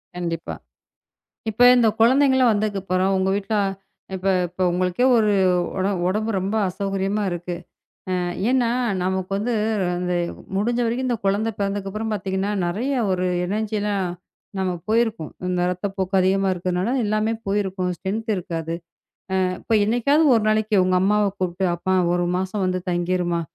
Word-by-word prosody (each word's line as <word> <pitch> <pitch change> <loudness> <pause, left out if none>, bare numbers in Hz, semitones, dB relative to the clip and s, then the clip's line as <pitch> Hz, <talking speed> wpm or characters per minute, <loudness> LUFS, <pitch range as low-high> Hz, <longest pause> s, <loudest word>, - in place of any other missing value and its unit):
கண்டிப்பா! 170 -2 -4 1.0
இப்ப 220 +3 0
இந்தக் 225 -2 +2
குழந்தைகெல்லாம் 260 +1 +5
வந்தத்துக்குப்பறம், 195 -3 0
உங்க 190 0 +1
வீட்ல 205 +2 -3 0.6
இப்ப 185 -1 -1
உங்களுக்கே 180 +6 0
ஒரு 215 -2 +3 0.8
உடம்பு 215 +4 -1
ரொம்ப 195 +3 -2
அசௌகரியமா 195 +2 -2
இருக்கு. 175 0 -4 1.0
என்னா 250 -2 +2 0.3
நமக்கு 185 +1 -2
வந்து 235 +4 -1 0.4
அந்த 180 0 -1 0.4
முடிஞ்ச 235 +5 0
வரைக்கும் 240 +3 -1
இந்தக் 235 -5 -2
குழந்த 205 +3 +1
பிறந்ததுக்கு 200 0 -2
அப்பறம் 220 +2 -3
பாத்தீங்கன்னா, 195 0 -2
நெறைய 220 +11 -1 0.2
ஒரு 185 0 0 0.2
எனர்ஜியெல்லாம் 205 0 -1 0.5
நமக்கு 180 -2 -2
போயிருக்கும். 225 -7 +1 0.2
இந்த 180 -1 0
ரத்தப்போக்கு 190 +1 -2
அதிகமா 195 +1 +2
இருக்கறனால, 180 +5 -1
எல்லாமே 215 +2 0
போயிருக்கும். 190 -2 -1
ஸ்ட்ரென்த் 220 +4 -3
இருக்காது. 165 -3 -4 0.7
அ - - +2
அப்போ 225 - +1
என்னைக்காவது 245 +8 +3
ஒரு 225 - +1
நாளைக்கு 215 -2 +2
உங்க 185 0 +2
அம்மாவ 210 +2 +3
கூப்பிட்டு, 185 +1 -1
அம்மா! 185 +2 -1 0.2
ஒரு 175 0 0
மாசம் 190 +2 -2
வந்து 185 0 -1
தங்கிருமா! 175 -1 0
195 Hz, 130 wpm, -22 LUFS, 185-215 Hz, 1.0 s, குழந்தைகெல்லாம்